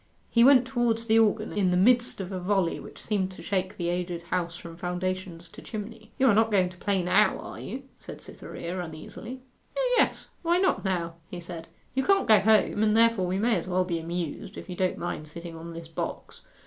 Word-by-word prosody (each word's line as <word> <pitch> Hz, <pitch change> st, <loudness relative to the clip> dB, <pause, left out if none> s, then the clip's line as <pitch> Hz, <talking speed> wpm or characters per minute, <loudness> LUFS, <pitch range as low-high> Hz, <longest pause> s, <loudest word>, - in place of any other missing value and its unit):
He 235 Hz, -, +5 dB
went 260 Hz, -1 st, +7 dB
towards 240 Hz, -3 st, 0 dB
the 225 Hz, 0 st, +4 dB
organ, 220 Hz, 0 st, +2 dB
in 195 Hz, -3 st, +2 dB
the 180 Hz, -, +2 dB
midst 240 Hz, +5 st, +4 dB
of 190 Hz, 0 st, -5 dB
a 185 Hz, -, -3 dB
volley 185 Hz, -2 st, +1 dB
which -, -, -11 dB
seemed 200 Hz, -4 st, -1 dB
to -, -, -11 dB
shake 190 Hz, 0 st, -2 dB
the 175 Hz, -1 st, -1 dB
aged 175 Hz, -1 st, -2 dB
house 170 Hz, -1 st, -2 dB
from 170 Hz, -1 st, -10 dB
foundations 180 Hz, 0 st, -4 dB
to -, -, -12 dB
chimney. 220 Hz, 0 st, -8 dB
'You 265 Hz, -, +3 dB
are 240 Hz, -, +6 dB
not 225 Hz, +2 st, +4 dB
going 190 Hz, -4 st, +3 dB
to 180 Hz, -, -14 dB
play 195 Hz, 0 st, 0 dB
now, 180 Hz, -, +4 dB
are -, -, -8 dB
you?' 270 Hz, +2 st, -6 dB, 0.2 s
said -, -, -9 dB
Cytherea 180 Hz, +2 st, -6 dB
uneasily. 175 Hz, +10 st, -8 dB, 0.4 s
'O -, -, +2 dB
yes. -, -, +1 dB
Why 345 Hz, +1 st, +2 dB
not 375 Hz, 0 st, +2 dB
now?' 170 Hz, -4 st, -2 dB
he 180 Hz, -, -6 dB
said. 170 Hz, -1 st, -8 dB, 0.3 s
'You 265 Hz, -, +1 dB
can't 395 Hz, +3 st, +3 dB
go 215 Hz, -2 st, +7 dB
home, 215 Hz, 0 st, +3 dB
and 215 Hz, 0 st, +3 dB
therefore 230 Hz, -5 st, +4 dB
we 185 Hz, +1 st, -1 dB
may 225 Hz, +3 st, +2 dB
as 175 Hz, -, -4 dB
well 185 Hz, 0 st, +2 dB
be 170 Hz, -2 st, -2 dB
amused, 170 Hz, +3 st, -5 dB
if -, -, -8 dB
you -, -, -4 dB
don't 185 Hz, 0 st, 0 dB
mind 165 Hz, -3 st, -4 dB
sitting 170 Hz, +2 st, -8 dB
on 165 Hz, +1 st, -8 dB
this 165 Hz, 0 st, -8 dB
box. 165 Hz, -, -6 dB
185 Hz, 220 wpm, -27 LUFS, 175-225 Hz, 0.4 s, went